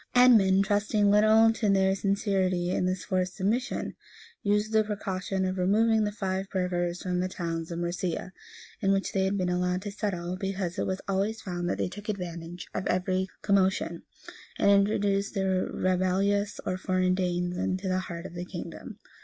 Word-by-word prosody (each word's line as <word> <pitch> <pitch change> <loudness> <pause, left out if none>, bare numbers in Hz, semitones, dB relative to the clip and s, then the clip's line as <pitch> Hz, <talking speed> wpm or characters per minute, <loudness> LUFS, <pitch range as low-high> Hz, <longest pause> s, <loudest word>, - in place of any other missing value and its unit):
Edmund, 200 -6 +6
trusting 205 0 +2
little 220 +2 +6
to 220 -2 0
their 190 -1 +3
sincerity 195 -3 0
in 180 - +1
this 185 0 -2
forced 185 -2 -1
submission, 225 +7 -1 0.5
used 210 +1 +1
the 220 0 +5
precaution 195 -2 -2
of 185 0 -2
removing 215 +4 +3
the 210 - -1
Five 195 -2 -3
burgers 175 -2 -1
from 180 -1 -1
the 185 - 0
towns 165 -3 -4
of 170 - -4
Mercia, 175 +1 -3 0.5
in 195 -2 +2
which 195 0 0
they 190 -1 +1
had 195 +1 0
been 185 -2 0
allowed 180 +1 0
to 205 - -4
settle; 185 -4 -3
because 190 -2 -3
it - - 0
was 190 0 -2
always 200 +3 -1
found 175 -2 -3
that - - -1
they - - 0
took 205 +3 -9
advantage 175 -3 -5
of 185 - -2
every 185 +1 0 0.2
commotion, 195 -2 +1 0.6
and 200 - +4
introduced 200 0 +2
the 195 -1 0 0.3
rebellious 190 +2 +1
or 185 - -2
foreign 185 -1 +1
Danes 180 -1 -1
into 185 +2 -2
the 185 0 +1
heart 170 -2 -6
of - - -8
the 175 0 -5
kingdom. - - -8
190 Hz, 175 wpm, -28 LUFS, 180-200 Hz, 0.6 s, Edmund